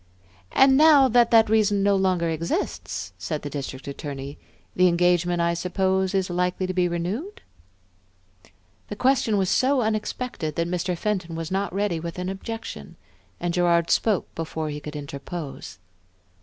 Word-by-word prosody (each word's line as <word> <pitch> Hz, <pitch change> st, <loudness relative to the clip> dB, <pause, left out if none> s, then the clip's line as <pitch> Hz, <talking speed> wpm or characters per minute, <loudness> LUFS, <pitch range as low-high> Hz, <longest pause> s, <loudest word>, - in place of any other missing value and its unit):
"And 265 Hz, 0 st, +5 dB
now 295 Hz, -3 st, +7 dB
that 240 Hz, 0 st, +4 dB
that 225 Hz, -1 st, +6 dB
reason 210 Hz, -2 st, +2 dB
no 200 Hz, 0 st, +3 dB
longer 185 Hz, -3 st, +1 dB
exists," 160 Hz, -, -3 dB
said 150 Hz, -, -4 dB
the 145 Hz, -, -5 dB
District 135 Hz, -2 st, -6 dB
Attorney, 140 Hz, 0 st, -6 dB, 0.4 s
"the 180 Hz, 0 st, +5 dB
engagement, 175 Hz, 0 st, +2 dB
I 170 Hz, 0 st, +2 dB
suppose, 190 Hz, +2 st, 0 dB
is 190 Hz, -1 st, +1 dB
likely 180 Hz, +1 st, -1 dB
to 185 Hz, -, -3 dB
be 180 Hz, -1 st, +2 dB
renewed?" 190 Hz, -, -4 dB, 1.4 s
The 205 Hz, -, -6 dB
question 250 Hz, -2 st, +2 dB
was 190 Hz, -1 st, +1 dB
so 260 Hz, +6 st, +2 dB
unexpected 215 Hz, -, -3 dB
that 170 Hz, -, 0 dB
Mr. 180 Hz, 0 st, -2 dB
Fenton 185 Hz, -4 st, -2 dB
was 165 Hz, 0 st, -5 dB
not 195 Hz, +1 st, -1 dB
ready 195 Hz, -3 st, -1 dB
with 170 Hz, +1 st, -6 dB
an 180 Hz, +1 st, -3 dB
objection, 225 Hz, +4 st, -7 dB, 0.4 s
and 175 Hz, -1 st, -2 dB
Gerard 170 Hz, -1 st, +2 dB
spoke 210 Hz, -6 st, +1 dB
before 160 Hz, -1 st, -4 dB
he 150 Hz, -, -5 dB
could 150 Hz, +1 st, -8 dB
interpose. 140 Hz, -, -7 dB
180 Hz, 155 wpm, -24 LUFS, 165-210 Hz, 1.4 s, now